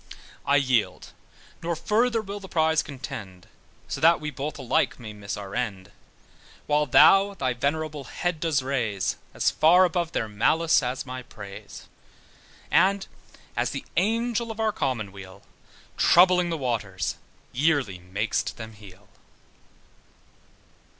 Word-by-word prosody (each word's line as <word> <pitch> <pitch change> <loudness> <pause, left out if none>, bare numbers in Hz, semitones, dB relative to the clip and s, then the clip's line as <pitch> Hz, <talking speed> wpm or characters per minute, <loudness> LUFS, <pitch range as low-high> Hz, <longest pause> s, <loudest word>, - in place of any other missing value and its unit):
I 140 - +4
yield, 130 -5 +1 0.5
nor 170 0 -2
further 225 +6 +1
will 200 0 -6
the 190 -1 -11
prize 160 -1 +2
contend, 100 - -8 0.4
So - - -5
that 165 +1 +6
we 150 0 -4
both 145 +2 -5
alike 130 -4 0
may 110 -3 -8
miss 105 -1 -6
our 100 -1 -8
end: 105 -5 -3 0.7
While 150 0 +2
thou 195 +9 +6
thy 130 -7 -1
venerable 145 +3 -2
head 175 +4 -3
dost 155 -5 0
raise 115 -8 -1 0.2
As - - +2
far 180 +4 +5
above 170 -1 -1
their 110 - -1
malice 155 +11 +2
as 125 0 -3
my 130 -1 -6
praise, 105 -5 -11 0.8
And 195 +1 +3 0.5
as - - 0
the - - -5
Angel 230 +4 0
of 225 0 -7
our 220 -1 +2
commonweal, 100 - -4 0.5
Troubling 180 0 +5
the 165 - -2
waters, 110 - -2 0.3
yearly 135 - +1
mak'st 95 +5 -2
them 110 -1 -8
heal. 100 -2 -15
140 Hz, 130 wpm, -25 LUFS, 110-170 Hz, 0.8 s, that